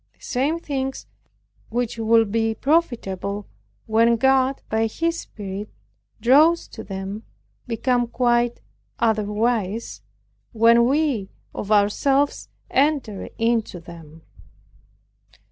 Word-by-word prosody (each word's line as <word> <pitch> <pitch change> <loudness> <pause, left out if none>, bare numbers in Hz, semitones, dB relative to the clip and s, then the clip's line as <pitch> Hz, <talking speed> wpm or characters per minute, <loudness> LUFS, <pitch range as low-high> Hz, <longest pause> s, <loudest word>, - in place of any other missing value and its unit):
The - - -38
same 275 +6 0
things 270 -5 -4 0.6
which 235 0 -2
would 225 -1 +3
be 225 0 0
profitable, 210 - -1 0.4
when 230 +1 +3
God, 265 +2 +2
by 220 +1 +1
His 335 +8 -2
Spirit, 205 0 -7 0.5
draws 295 +9 +4
to - - -9
them, 195 +2 -6 0.5
become 245 +1 0
quite 240 0 +1 0.4
otherwise, 220 -1 0 0.5
when 230 +1 +5
we 275 -8 0 0.2
of 210 - -5
ourselves 270 +8 +2 0.2
enter 270 -8 0
into 225 -5 0
them. 165 -2 -13
230 Hz, 95 wpm, -22 LUFS, 210-265 Hz, 0.6 s, when